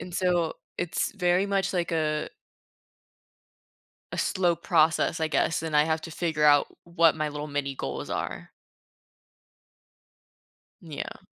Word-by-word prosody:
And 180 - -8
so 175 -3 +1 0.2
it's 175 - -1
very 180 -1 +2
much 195 -1 0
like 175 -2 -1
a 155 -2 0 1.8
a - - -4
slow 180 -3 +1
process, 165 -1 +2
I 160 - +1
guess, 155 +1 +1
and 160 -2 -3
I 150 - +6
have 160 0 0
to 165 - -8
figure 160 -2 -1
out 145 -1 +6 0.2
w 170 0 -18
what 165 -2 +6
my 155 -1 -1
little 150 0 -5
mini 145 -2 -3
goals 70 - -5
are. - - -4 2.3
N - - -13
yeah. - - -6
160 Hz, 145 wpm, -27 LUFS, 150-175 Hz, 2.3 s, I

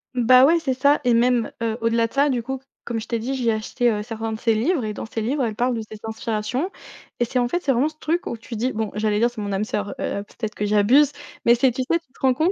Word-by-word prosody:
Bah 255 +1 +6
ouais, 330 +4 +5
c'est 285 -5 -1
ça 280 +3 +3
et 245 -1 +3
même, 240 0 +2
heu, 225 -1 -1
au-delà 230 0 +2
de - - -22
ça, 280 +1 +3
du 250 -3 0
coup, 265 +3 -4 0.3
comme 235 -1 -2
je 220 - -8
t'ai 235 - -1
dit, 250 +5 -3
j'ai 240 -3 +1
acheté, 230 +3 0
heu, 210 -1 -2
certains 225 0 -4
de 220 - -4
ses 225 -1 +2
livres 255 +3 +1
et 215 - -3
dans - - -6
ses 225 0 -4
livres, 265 +5 0
elle 225 -3 -1
parle 245 +2 +1
de 225 - -3
ses 215 0 -9
inspirations 225 - -2 0.5
et 240 - +3
c'est 250 +2 -1
en 245 - +2
fait 350 - 0
c'est 285 - +1
vraiment 260 +5 +2
ce 310 - -19
truc 340 +3 -1
où 235 - -4
tu 230 +1 -8
dis 245 +4 0
bon, 220 -2 -2
j'allais 210 0 +1
dire 235 +2 +3
c'est 240 -3 -8
mon 205 -1 -3
âme 195 +2 0
sœur, 205 -1 -3
heu, 200 - -2
peut-être 215 +1 -6
que 210 - -2
j'abuse, 220 +8 +4 0.3
mais 235 - +6
c'est 250 +2 +3
tu 255 - -3
sais, 335 +6 +1
tu 330 - -38
te - - -22
rends 265 -1 +4
compte 315 +8 +2
235 Hz, 295 wpm, -23 LUFS, 220-260 Hz, 0.5 s, Bah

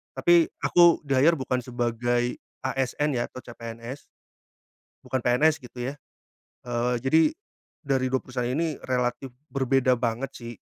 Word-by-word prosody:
Tapi 175 -1 +5
aku 175 -1 +5
di 140 - -8
hire 160 +6 +5
bukan 130 -2 -1
sebagai 120 0 -1 0.3
ASN 135 +2 0
ya 120 -1 -1
atau - - -13
CPNS. 115 +3 -8 1.0
Bukan 130 - -1
PNS 150 +7 +3
gitu 125 +1 -6
ya. - - -10 0.8
Eee, 120 +1 0
jadi 155 +5 +4 0.6
dari 135 -3 +1
2 130 - +2
perusahaan 125 -1 -4
ini 160 0 -1
relatif 125 0 -1 0.2
berbeda 130 -2 +2
banget 120 +3 -2
sih, 120 -1 -7
130 Hz, 135 wpm, -26 LUFS, 120-140 Hz, 1.0 s, Tapi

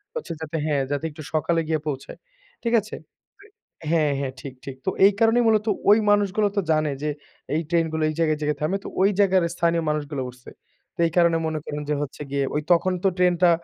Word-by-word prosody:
হচ্ছে 475 - -4
যাতে 160 +1 -4
হ্যাঁ, 145 -3 +1
যাতে 145 +3 -1
একটু 155 +1 -10
সকালে 165 +2 +1
গিয়ে 160 -1 0
পৌঁছায়, 140 -2 -5 0.5
ঠিক 235 0 0
আছে? 210 - -9 0.9
হ্যাঁ, 155 -3 +2
হ্যাঁ, 135 -2 -3
ঠিক, 135 -2 -7
ঠিক। 135 - -6
তো - - +2 0.2
এই 200 - +7
কারণেই 230 +1 +4
মূলত 215 -1 +3 0.2
ওই 210 - +8
মানুষগুলো 205 0 +2
তো - - +4
জানে, 155 -1 +2
যে, 150 - 0 0.5
এই 160 - +1
ট্রেনগুলো 160 -2 +1
এই 155 - -4
জায়গায় 155 -2 +2
জেগে 150 0 0
থামে। 165 +6 0
তো - - -7
ওই 195 - +5
জায়গায় 190 -2 +4
স্থানীয় 170 -1 +1
মানুষগুলো 150 -2 -2
উঠছে। 125 0 -13 0.5
তো - - -28
এই - - -5
কারণে 170 -1 +4
মনে 155 -1 -2
করেন 150 0 -4
যে, - - +2
হচ্ছে 145 0 -6
গিয়ে 140 -1 0 0.3
তখন 185 +2 +1
তো - - +4
ট্রেনটা 180 -1 +4
160 Hz, 200 wpm, -24 LUFS, 150-185 Hz, 0.9 s, ওই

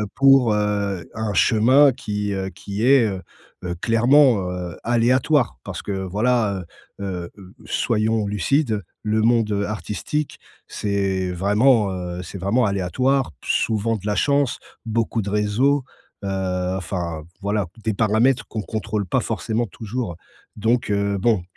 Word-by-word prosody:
pour, 135 -5 +5
heu, 100 -4 -1
un 110 -2 -2
chemin 130 +8 +5
qui, 105 -2 -3
heu, 95 0 -3
qui 100 +5 -4
est, 130 -4 +5
heu 95 -2 -4 0.4
heu, 90 -1 -3
clairement, 115 - +4
heu, 90 -1 -5
aléatoire. 120 +3 +2
Parce - - -6
que, 100 - -4
voilà, 100 +1 0 0.4
heu 100 - -4
heu, 90 -3 -5 0.3
soyons 110 -1 0
lucides, 110 +2 0 0.2
le 110 0 +1
monde, 115 -2 +2
heu, 100 0 0
artistique, 105 +8 -4 0.3
c'est 95 -2 -1
vraiment, 105 +3 +3
heu, 90 -1 -5
c'est 95 - -8
vraiment 110 +6 +2
aléatoire, 115 +6 0
souvent 110 0 0
de 100 - -12
la 105 - 0
chance, 140 +6 +1 0.3
beaucoup 115 0 -1
de 100 - -4
réseaux, 110 +7 +1 0.4
heu, 95 -1 -2
enfin 85 -3 -4 0.2
voilà, 100 -2 -1 0.2
des 110 - 0
paramètres 110 +6 +2
qu'on 110 - -4
contrôle 105 -2 -3
pas - - +1
forcément 115 +1 -2
toujours. 110 -3 -5 0.4
Donc 115 +2 0
heu, 100 0 0
bon, 105 -4 +2
105 Hz, 140 wpm, -22 LUFS, 95-120 Hz, 0.4 s, pour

